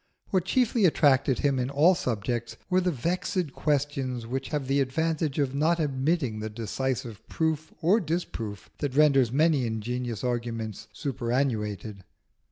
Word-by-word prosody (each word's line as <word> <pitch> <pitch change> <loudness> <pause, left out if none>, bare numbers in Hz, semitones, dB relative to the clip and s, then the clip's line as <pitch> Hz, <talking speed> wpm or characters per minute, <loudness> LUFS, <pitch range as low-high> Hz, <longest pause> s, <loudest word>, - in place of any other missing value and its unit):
What 185 -3 +2
chiefly 235 -1 +2
attracted 140 -5 +3
him 140 -2 +2
in 125 +1 -1
all 150 +6 +5
subjects 120 - -2
were 185 +1 +4
the 180 - +1
vexed 170 +1 -1
questions 135 -5 -1
which 130 +3 -3
have 145 -3 -2
the 135 +2 +1
advantage 155 +2 -1
of 140 -3 +1
not 160 +4 +2
admitting 135 -4 0
the 110 0 -4
decisive 120 +1 -3
proof 160 -1 -1
or 190 +7 +5
disproof 150 - -4
that 140 -3 -2
renders 140 -5 +5
many 150 0 +3
ingenious 120 +1 -3
arguments 115 -3 -3
superannuated. 115 -6 -2
135 Hz, 140 wpm, -27 LUFS, 120-155 Hz, -, all